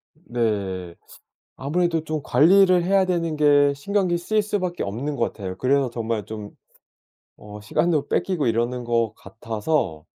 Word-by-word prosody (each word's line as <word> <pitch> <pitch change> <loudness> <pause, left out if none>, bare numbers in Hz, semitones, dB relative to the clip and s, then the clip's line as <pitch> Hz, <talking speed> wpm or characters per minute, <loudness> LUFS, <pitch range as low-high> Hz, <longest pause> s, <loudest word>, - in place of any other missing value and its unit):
네. 100 - -3 0.6
아무래도 165 +3 0
좀 155 -1 -3
관리를 180 +7 +5
해야 195 +1 +3
되는 170 -3 -1
게 145 -1 +4
신경이 180 +3 0
쓰일 215 +5 0
수 205 0 -2
밖에 175 -1 -3
없는 130 +9 -3
것 115 - -1
같아요. 95 -3 -6
그래서 135 +2 +1
정말 115 -2 -3
좀 105 -1 -7 0.9
어 105 0 -10
시간도 155 +8 0
뺏기고 175 -8 0
이러는 120 +2 0
것 115 -2 0
같아서 110 - -3
140 Hz, 285 characters per minute, -23 LUFS, 110-175 Hz, 0.9 s, 관리를